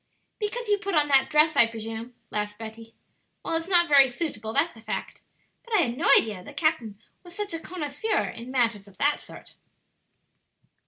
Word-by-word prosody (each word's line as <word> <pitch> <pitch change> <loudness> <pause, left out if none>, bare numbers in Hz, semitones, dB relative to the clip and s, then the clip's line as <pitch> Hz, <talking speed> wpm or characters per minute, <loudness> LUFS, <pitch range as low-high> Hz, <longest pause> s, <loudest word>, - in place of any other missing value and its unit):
"Because 470 +3 -3
you 410 -1 +2
put 395 -2 -3
on 295 -1 +3
that 270 -1 +4
dress, 310 0 +4
I 235 - +6
presume," 225 +1 -6 0.2
laughed 210 0 -3
Betty. 225 0 -10 0.5
"Well, - - -1
it's 330 +1 -2
not 350 -2 +4
very 280 -3 +7
suitable, 240 -4 -5
that's - - +1
a 225 - -14
fact. 220 -1 -5 0.4
But 465 -2 -2
I 395 - +5
had 240 -4 -2
no 285 +2 0
idea 215 -3 0
that 180 - -12
the 290 - -10
captain 290 -10 -1 0.2
was 350 -1 -14
such 415 -2 -4
a 330 - -3
connoisseur 330 +5 -2
in 235 +2 -9
matters 230 -6 0
of 195 - -18
that 290 +1 +1
sort." - - -12
280 Hz, 195 wpm, -26 LUFS, 225-335 Hz, 0.5 s, very